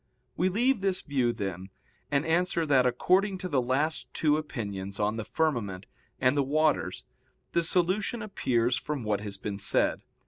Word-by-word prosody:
We 185 Hz, +2 st, +2 dB
leave 240 Hz, +4 st, +2 dB
this 190 Hz, -1 st, 0 dB
view, 130 Hz, -5 st, +1 dB
then, 95 Hz, -4 st, -5 dB, 0.4 s
and 140 Hz, +2 st, +1 dB
answer 170 Hz, 0 st, +1 dB
that 135 Hz, -4 st, +4 dB
according 185 Hz, -, +2 dB
to 185 Hz, -, -5 dB
the 140 Hz, -7 st, +1 dB
last 140 Hz, +6 st, -1 dB
two 150 Hz, -2 st, +3 dB
opinions 100 Hz, -10 st, -5 dB
on 105 Hz, +2 st, 0 dB
the 115 Hz, -, -3 dB
firmament 115 Hz, -, -1 dB, 0.3 s
and 130 Hz, +1 st, +3 dB
the 145 Hz, -, +3 dB
waters 150 Hz, +2 st, +1 dB, 0.5 s
the 170 Hz, -, +2 dB
solution 185 Hz, +7 st, 0 dB
appears 120 Hz, -, +1 dB
from 135 Hz, +1 st, -4 dB
what 105 Hz, -2 st, 0 dB
has 100 Hz, -2 st, -5 dB
been 100 Hz, 0 st, -5 dB
said. 95 Hz, -, +2 dB
140 Hz, 165 wpm, -28 LUFS, 110-170 Hz, 0.5 s, that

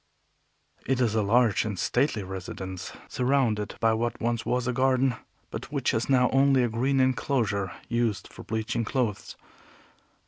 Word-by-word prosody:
It 135 Hz, -1 st, +1 dB
is 120 Hz, -4 st, +2 dB
a 110 Hz, -, +2 dB
large 110 Hz, +1 st, +3 dB
and 105 Hz, -3 st, -4 dB
stately 125 Hz, -, 0 dB
residence, 95 Hz, 0 st, -6 dB, 0.2 s
surrounded 125 Hz, -5 st, 0 dB
by 115 Hz, 0 st, +3 dB
what 120 Hz, +1 st, -2 dB
was 115 Hz, 0 st, -1 dB
once 125 Hz, 0 st, 0 dB
a 125 Hz, -, 0 dB
garden, 130 Hz, 0 st, +2 dB, 0.4 s
but -, -, -7 dB
which -, -, 0 dB
is 110 Hz, +4 st, -1 dB
now 125 Hz, -2 st, +4 dB
only 135 Hz, -1 st, +4 dB
a 120 Hz, -, +1 dB
green 130 Hz, +5 st, +1 dB
enclosure 125 Hz, -, +1 dB, 0.2 s
used 115 Hz, -3 st, -1 dB
for -, -, -12 dB
bleaching 110 Hz, +1 st, -2 dB
clothes. 115 Hz, -3 st, -2 dB
120 Hz, 150 wpm, -27 LUFS, 110-130 Hz, 0.4 s, now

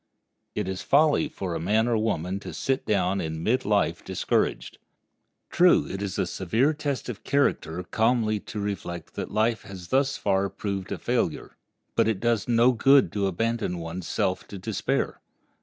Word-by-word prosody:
It 105 Hz, -3 st, -2 dB
is 95 Hz, 0 st, -3 dB
folly 150 Hz, +1 st, +3 dB
for 90 Hz, -3 st, -4 dB
a -, -, -2 dB
man 105 Hz, +7 st, +2 dB
or 120 Hz, -, +2 dB
woman 100 Hz, -4 st, -1 dB
to -, -, -8 dB
sit 135 Hz, +1 st, -1 dB
down 95 Hz, -2 st, +1 dB
in 80 Hz, 0 st, -4 dB
mid 125 Hz, +6 st, +1 dB
life 105 Hz, -1 st, +1 dB
discouraged. -, -, -1 dB, 0.7 s
True, 180 Hz, 0 st, +5 dB
it 95 Hz, -, -5 dB
is 100 Hz, -2 st, -3 dB
a -, -, +1 dB
severe 115 Hz, -, +1 dB
test 145 Hz, -3 st, -3 dB
of 120 Hz, -4 st, -6 dB
character 90 Hz, -, 0 dB
calmly 110 Hz, +2 st, +1 dB
to 105 Hz, -, -7 dB
reflect 100 Hz, -4 st, -5 dB
that -, -, -4 dB
life 110 Hz, +1 st, +1 dB
has 90 Hz, -3 st, -10 dB
thus 135 Hz, +1 st, +2 dB
far 100 Hz, -1 st, +1 dB
proved 100 Hz, -1 st, -4 dB
a -, -, -2 dB
failure, -, -, -2 dB, 0.4 s
but -, -, +3 dB
it 110 Hz, -4 st, 0 dB
does 115 Hz, -2 st, +1 dB
no 120 Hz, +1 st, +5 dB
good 135 Hz, +3 st, +5 dB
to 100 Hz, -2 st, 0 dB
abandon 115 Hz, 0 st, -1 dB
one's 85 Hz, +1 st, -6 dB
self -, -, -1 dB
to 100 Hz, -, -8 dB
despair. 95 Hz, +1 st, -2 dB
105 Hz, 175 wpm, -26 LUFS, 95-120 Hz, 0.7 s, True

